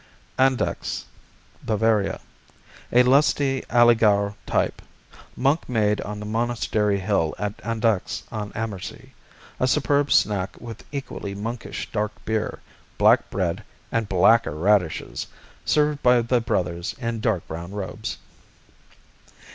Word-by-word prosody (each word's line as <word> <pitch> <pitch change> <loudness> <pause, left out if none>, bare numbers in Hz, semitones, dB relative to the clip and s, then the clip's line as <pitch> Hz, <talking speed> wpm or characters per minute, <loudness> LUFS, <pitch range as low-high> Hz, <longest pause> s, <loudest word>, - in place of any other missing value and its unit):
Andechs 130 -1 +1 0.6
Bavaria 110 -2 +1 0.7
A 125 +1 +6
lusty 135 0 +3
Allgäuer 110 -4 +4
type. - - 0 0.5
Monk 140 +4 +1
made 105 -3 +1
on 105 0 -5
the 105 - -6
monastery 110 -2 0
hill 95 -5 0
at 105 0 -3
Andechs 110 -3 -1
on 105 -1 -4
Ammersee. 105 -4 -6 0.5
A 130 - +2
superb 145 0 +2
snack 95 -3 +2
with 115 -2 -9
equally 130 -8 -5
monkish 115 +4 -5
dark 105 -1 -1
beer, 110 -1 -1 0.4
black - - +4
bread 90 -4 -2 0.3
and 115 -3 -1
blacker 95 -1 +4
radishes, 90 -1 +1 0.4
served 150 -1 +2
by 125 -1 +5
the 120 +1 +1
brothers 90 -5 -2
in 115 -2 -3
dark 110 -6 -1
brown 85 +3 -6
robes. 105 +2 -5
110 Hz, 115 wpm, -24 LUFS, 100-120 Hz, 0.7 s, A